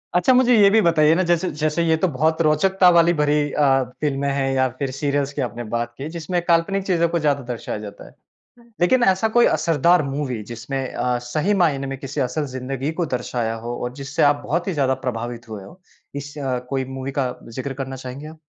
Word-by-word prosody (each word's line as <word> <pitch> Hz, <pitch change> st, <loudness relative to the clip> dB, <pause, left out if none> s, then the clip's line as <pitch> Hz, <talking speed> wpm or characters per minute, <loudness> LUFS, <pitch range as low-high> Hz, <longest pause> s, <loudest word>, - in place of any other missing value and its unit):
अच्छा, 180 Hz, +9 st, +4 dB
मुझे 250 Hz, -1 st, +5 dB
ये 200 Hz, -1 st, +7 dB
भी 220 Hz, +3 st, +4 dB
बताइए 160 Hz, -3 st, +4 dB
ना, 185 Hz, -, +2 dB
जैसे 175 Hz, +1 st, +1 dB
जैसे 155 Hz, +2 st, -1 dB
ये 160 Hz, -1 st, +3 dB
तो -, -, +5 dB
बहुत 160 Hz, +5 st, +1 dB
रोचकता 180 Hz, +4 st, +4 dB
वाली 170 Hz, 0 st, +5 dB
भरी 150 Hz, -1 st, +1 dB
अ, 135 Hz, -2 st, +3 dB, 0.2 s
फिल्में 140 Hz, -2 st, 0 dB
हैं 135 Hz, -1 st, 0 dB
या 130 Hz, 0 st, +2 dB
फिर 140 Hz, -2 st, -2 dB
सीरियल्स 140 Hz, +1 st, -1 dB
की 140 Hz, -, -3 dB
आपने 120 Hz, -1 st, -4 dB
बात 120 Hz, 0 st, -2 dB
की, 140 Hz, -, -5 dB
जिसमें 170 Hz, +2 st, -2 dB
काल्पनिक 175 Hz, +4 st, +1 dB
चीज़ों 170 Hz, -3 st, +2 dB
को 170 Hz, -, 0 dB
ज़्यादा 145 Hz, -2 st, +1 dB
दर्शाया 120 Hz, -2 st, -5 dB
जाता 105 Hz, -1 st, -10 dB
है। -, -, -18 dB, 0.7 s
लेकिन 245 Hz, +8 st, +4 dB
ऐसा 190 Hz, +4 st, +2 dB
कोई 240 Hz, -, +6 dB
असरदार 170 Hz, +1 st, +3 dB
मूवी, 135 Hz, -4 st, -3 dB
जिसमें 120 Hz, +4 st, -5 dB
अ, 125 Hz, 0 st, 0 dB
सही 155 Hz, +11 st, 0 dB
मायने 140 Hz, -5 st, +1 dB
में 135 Hz, 0 st, -5 dB
किसी 140 Hz, +1 st, -4 dB
असल 140 Hz, +4 st, -1 dB
ज़िंदगी 135 Hz, +3 st, -3 dB
को -, -, +1 dB
दर्शाया 120 Hz, -2 st, -2 dB
हो 120 Hz, -, -3 dB
और 125 Hz, 0 st, -4 dB
जिससे 140 Hz, +4 st, -1 dB
आप 145 Hz, 0 st, +3 dB
बहुत 170 Hz, +4 st, -1 dB
ही 190 Hz, -, 0 dB
ज़्यादा 135 Hz, -4 st, +1 dB
प्रभावित 120 Hz, -1 st, -4 dB
हुए 105 Hz, -3 st, -7 dB
हों। 160 Hz, -, -13 dB, 0.4 s
इस 145 Hz, +1 st, -9 dB, 0.4 s
कोई 135 Hz, -1 st, -1 dB
मूवी 135 Hz, +1 st, -4 dB
का 125 Hz, -2 st, 0 dB, 0.2 s
ज़िक्र 135 Hz, +1 st, -3 dB
करना 130 Hz, 0 st, -7 dB
चाहेंगे 130 Hz, +3 st, -8 dB
आप? 160 Hz, 0 st, -12 dB
145 Hz, 210 wpm, -21 LUFS, 130-170 Hz, 0.7 s, ये